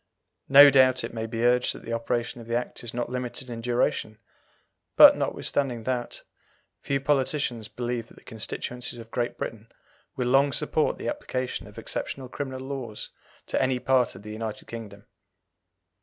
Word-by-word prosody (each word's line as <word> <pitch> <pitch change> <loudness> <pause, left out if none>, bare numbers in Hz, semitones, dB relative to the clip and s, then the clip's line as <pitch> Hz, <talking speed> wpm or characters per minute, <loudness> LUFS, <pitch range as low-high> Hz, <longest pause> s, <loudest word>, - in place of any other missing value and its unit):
No 140 +1 +10
doubt 130 -1 +5
it - - -5
may 115 -1 -3
be 115 +1 -2
urged 125 0 +3
that - - -11
the 115 - -4
operation 120 +1 -2
of 115 - -12
the 115 - -1
Act 120 0 -3
is 120 - -5
not 120 0 -3
limited 125 0 -4
in 115 -1 -5
duration; 120 -2 0 0.8
but, - - +10
notwithstanding 125 -5 -1
that, 125 0 -3 0.6
few 140 - -1
politicians 135 -5 0
believe 120 -1 -4
that - - -18
the - - -18
constituencies 120 +2 -5
of 115 -1 -11
Great 120 0 -2
Britain 115 0 -6 0.4
will 125 -2 -1
long 135 +2 +4
support - - +1
the - - -5
application 130 0 -3
of - - -15
exceptional 130 -2 -4
criminal 130 -1 -5
laws 130 -5 -6 0.4
to - - -1
any 130 -1 +2
part 125 -3 +2
of 95 - -12
the 105 - -8
United 110 -1 -5
Kingdom. 105 -3 -9
120 Hz, 170 wpm, -26 LUFS, 115-130 Hz, 0.8 s, No